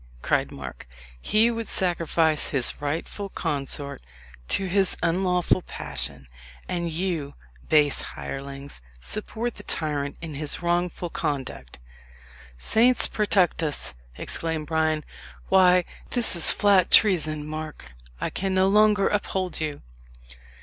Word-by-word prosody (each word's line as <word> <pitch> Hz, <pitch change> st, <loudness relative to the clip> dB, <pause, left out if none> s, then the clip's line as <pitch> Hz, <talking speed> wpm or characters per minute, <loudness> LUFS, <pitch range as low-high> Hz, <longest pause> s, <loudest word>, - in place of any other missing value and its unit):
cried -, -, +1 dB
Mark. 65 Hz, -2 st, -9 dB, 0.3 s
"He 220 Hz, -, +3 dB
would 230 Hz, -1 st, -4 dB
sacrifice 165 Hz, -3 st, +2 dB
his 135 Hz, -1 st, +1 dB
rightful 165 Hz, +7 st, -3 dB
consort 140 Hz, -, -3 dB, 0.5 s
to 195 Hz, -, 0 dB
his 190 Hz, +1 st, +1 dB
unlawful 180 Hz, +1 st, +2 dB
passion; 65 Hz, -, -6 dB, 0.4 s
and 170 Hz, -2 st, -2 dB
you, 165 Hz, -4 st, -2 dB, 0.3 s
base 150 Hz, -2 st, +4 dB
hirelings, 140 Hz, -, -7 dB, 0.2 s
support 220 Hz, -, -4 dB
the -, -, -10 dB
tyrant 145 Hz, -6 st, -3 dB
in 165 Hz, -2 st, -7 dB
his 150 Hz, +4 st, -2 dB
wrongful 175 Hz, 0 st, -1 dB
conduct!" 130 Hz, -, -4 dB, 0.8 s
"Saints 230 Hz, -, +3 dB
protect 200 Hz, -5 st, +1 dB
us!" 150 Hz, -, -2 dB, 0.2 s
exclaimed 160 Hz, -2 st, -2 dB
Bryan. 155 Hz, -1 st, 0 dB, 0.4 s
"Why, 180 Hz, -2 st, +5 dB, 0.2 s
this 240 Hz, -6 st, +2 dB
is 170 Hz, -, +7 dB
flat 200 Hz, -3 st, +4 dB
treason. 155 Hz, -7 st, +4 dB
Mark, 155 Hz, -, -7 dB, 0.3 s
I -, -, -2 dB
can 190 Hz, 0 st, -2 dB
no 190 Hz, 0 st, +4 dB
longer 210 Hz, -1 st, +4 dB
uphold 190 Hz, -4 st, -1 dB
you." 150 Hz, -2 st, -4 dB
165 Hz, 115 wpm, -25 LUFS, 145-190 Hz, 0.8 s, is